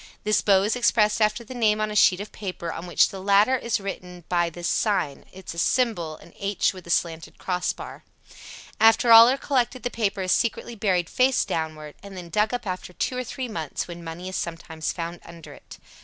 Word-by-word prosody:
This 215 0 +2
bow 195 -2 +4
is 210 +4 0
expressed 220 -3 +2
after 215 +2 +2
the 235 - -10
name 215 -3 +2
on 215 0 -1
a - - -5
sheet 185 -3 +5
of 205 +1 -7
paper 180 -5 -5
on 170 +2 -7
which 175 - +3
the 195 - -8
latter 200 +6 +4
is 235 -3 -1
written 180 -3 -7
by 175 -1 +1
this 175 +1 -5
sign 195 -10 0 0.2
[Symbol: 170 -3 -1 0.2
H 200 -1 0
with 180 -2 -8
slanted 165 -1 -1
cross 180 -1 -1
bar]. - - -10 0.8
After 225 +2 +5
all 230 +1 +10
are 265 - +1
collected 255 -2 -1
the 245 - -2
paper 205 -3 -1
is 185 - -1
secretly 235 0 0
buried 190 -6 0
face 255 +5 +2
downward, 155 -2 -4
and 200 -1 -10
then 175 -2 -8
dug 210 +5 +1
up 245 -1 -4
after 185 -1 -5
two 250 - -2
or 255 - -2
three 255 +1 -5
months, 160 -9 -4
when 170 -1 -9
money 165 +2 -7
is 185 - -5
sometimes 165 -1 -4
found 170 0 -6
under 170 -1 -12
it. - - -14
195 Hz, 200 wpm, -24 LUFS, 170-225 Hz, 0.8 s, all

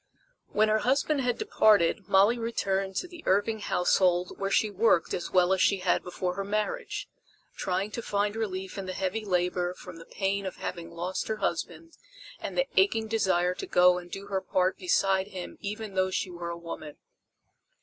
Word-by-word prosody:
When 215 +1 +2
her 215 0 +3
husband 275 +4 +1
had 245 -2 0
departed 210 - +3
Molly 205 +5 +5
returned 195 -4 -1
to 360 - -2
the 345 -2 -11
Irving 205 +3 +2
household 180 -2 +2
where 195 0 -1
she 210 +1 +2
worked 200 -4 +2
as 175 - -3
well 180 0 +4
as 190 - +1
she 200 - +4
had 180 - +2
before 180 0 -3
her 195 +2 -3
marriage, 215 - -2 0.5
trying 190 +3 -2
to 235 - -4
find 205 -1 -1
relief 190 -3 -4
in 190 - -5
the 185 - -3
heavy 195 +4 -2
labor 180 -2 0
from 180 -2 -11
the 165 - -12
pain 195 0 -1
of 185 - -6
having 170 -2 -6
lost 175 +2 -4
her 220 - -2
husband 215 - -3 0.4
and - - -6
the - - +3
aching 225 - +3
desire 190 -5 +1
to - - -7
go 180 0 +5
and 175 0 -12
do 195 +2 -7
her 195 -1 -2
part 185 0 +1
beside 195 - +2
him 185 -3 -8
even 210 0 -5
though 185 0 +1
she 185 0 -2
were 170 -1 -6
a 170 - -4
woman. 165 -3 -8
195 Hz, 190 wpm, -28 LUFS, 180-215 Hz, 0.5 s, Molly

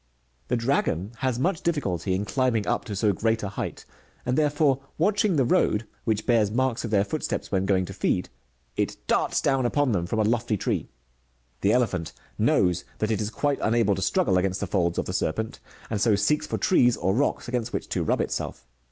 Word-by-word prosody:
The 125 - +1
dragon 115 - 0
has 130 0 -1
much 165 +5 0
difficulty 95 - -1
in 100 +2 -2
climbing 120 -2 +1
up - - -1
to 105 - -5
so 105 +1 +2
great 110 +3 0
a 100 - -2
height, 100 - -5 0.4
and 125 - +1
therefore, 145 -2 +2 0.2
watching 200 +2 +2
the 135 -4 +3
road, 115 -2 +2 0.2
which 110 -2 0
bears 115 -4 +3
marks 125 +2 0
of 115 - -3
their 100 -2 +3
foot 155 +9 -4
steps - - -3
when 95 -1 +1
going 95 -2 +2
to - - -8
feed, - - 0 0.5
it - - -1
darts - - +1
down 135 -2 +2
upon 140 +2 +1
them 90 -5 0
from 110 - -2
a 110 - +3
lofty 115 0 +1
tree. - - -2 0.7
The 100 - +3
elephant 100 -9 0 0.3
knows 90 -1 +2
that 110 +1 -1
it 110 - 0
is 105 - -1
quite 145 +5 -1
unable 110 -2 +2
to 95 - -3
struggle 95 -1 +2
against 95 0 -1
the - - -1
folds 85 -3 0
of - - 0
the 90 - -4
serpent, 105 +4 -2 0.3
and 105 -3 -1
so 110 -2 +4
seeks 125 +10 +1
for - - -2
trees 125 -10 +3
or 95 +2 +1
rocks 135 +2 0
against 120 -1 -2
which - - -3
to - - -1
rub - - +1
itself. - - -4
110 Hz, 210 wpm, -26 LUFS, 100-130 Hz, 0.7 s, so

